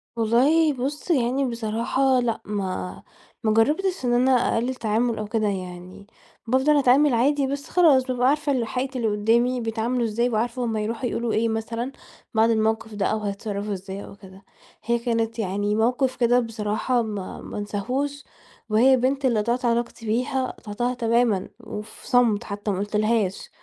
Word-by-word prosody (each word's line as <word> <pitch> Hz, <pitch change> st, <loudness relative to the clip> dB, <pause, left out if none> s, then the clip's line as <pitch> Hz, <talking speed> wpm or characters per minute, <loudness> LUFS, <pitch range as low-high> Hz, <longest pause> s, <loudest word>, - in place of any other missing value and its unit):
والله 275 Hz, +8 st, +3 dB
بُصّ، 280 Hz, +7 st, -3 dB
يعني 265 Hz, -1 st, +2 dB
بصراحة 235 Hz, +3 st, +1 dB
لأ، 235 Hz, -2 st, -1 dB
ما 190 Hz, -3 st, -4 dB, 0.4 s
ما 215 Hz, -1 st, +2 dB
جرّبتش 300 Hz, -, +1 dB
إن 240 Hz, -, +2 dB
أنا 255 Hz, +2 st, +3 dB
أقلّل 250 Hz, 0 st, +1 dB
تعامل 230 Hz, +1 st, 0 dB
أو 215 Hz, -1 st, -4 dB
كده 215 Hz, -1 st, 0 dB
يعني 185 Hz, 0 st, -6 dB, 0.4 s
بافضل 265 Hz, +5 st, +3 dB
أتعامل 275 Hz, +1 st, +4 dB
عادي 275 Hz, +3 st, +2 dB
بس 280 Hz, +1 st, -5 dB
خلاص، 305 Hz, -8 st, +5 dB
بابقى 250 Hz, -1 st, +1 dB
عارفة 285 Hz, -5 st, +1 dB
حقيقة 260 Hz, +3 st, -3 dB
اللي 230 Hz, -2 st, 0 dB
قُدّامي 235 Hz, +4 st, +2 dB
بيتعاملوا 230 Hz, +2 st, -1 dB
إزاي 235 Hz, +3 st, 0 dB
وعارفة 235 Hz, +2 st, -1 dB
هم 225 Hz, -1 st, -2 dB
هيروحوا 225 Hz, +3 st, -2 dB
يقولوا 235 Hz, -1 st, -2 dB
إيه 225 Hz, +1 st, +1 dB
مثلًا 230 Hz, +3 st, -3 dB, 0.4 s
بعد 225 Hz, +1 st, +4 dB
الموقف 220 Hz, 0 st, 0 dB
ده 200 Hz, -2 st, -1 dB
أو 220 Hz, -, 0 dB
هيتصرّفوا 205 Hz, 0 st, -4 dB
إزاي 195 Hz, +1 st, -7 dB
أو -, -, -12 dB
كده. 190 Hz, -1 st, -15 dB, 0.4 s
هي 235 Hz, 0 st, +1 dB
كانت 230 Hz, -1 st, -1 dB
يعني 205 Hz, +1 st, -1 dB
موقف 250 Hz, +4 st, +1 dB
كده 245 Hz, 0 st, +3 dB
بصراحة 225 Hz, +2 st, -1 dB
ما 205 Hz, -4 st, -5 dB
ما -, -, -8 dB
أنساهوش 255 Hz, +8 st, -3 dB, 0.5 s
وهي 240 Hz, +5 st, +5 dB
البنت 265 Hz, +2 st, +1 dB
اللي 235 Hz, -4 st, +2 dB
قطعت 240 Hz, +3 st, -1 dB
علاقتي 235 Hz, 0 st, -1 dB
بيها 255 Hz, +4 st, 0 dB
قطعتها 240 Hz, +4 st, -3 dB
تمامًا 230 Hz, -4 st, +1 dB
وفي 215 Hz, -1 st, -9 dB
صمت 240 Hz, -5 st, +3 dB
حتّى 205 Hz, +1 st, -4 dB
ما 190 Hz, -, -2 dB
قُلت 205 Hz, +1 st, -3 dB
لهاش. 215 Hz, -3 st, 0 dB
230 Hz, 165 wpm, -24 LUFS, 215-255 Hz, 0.5 s, خلاص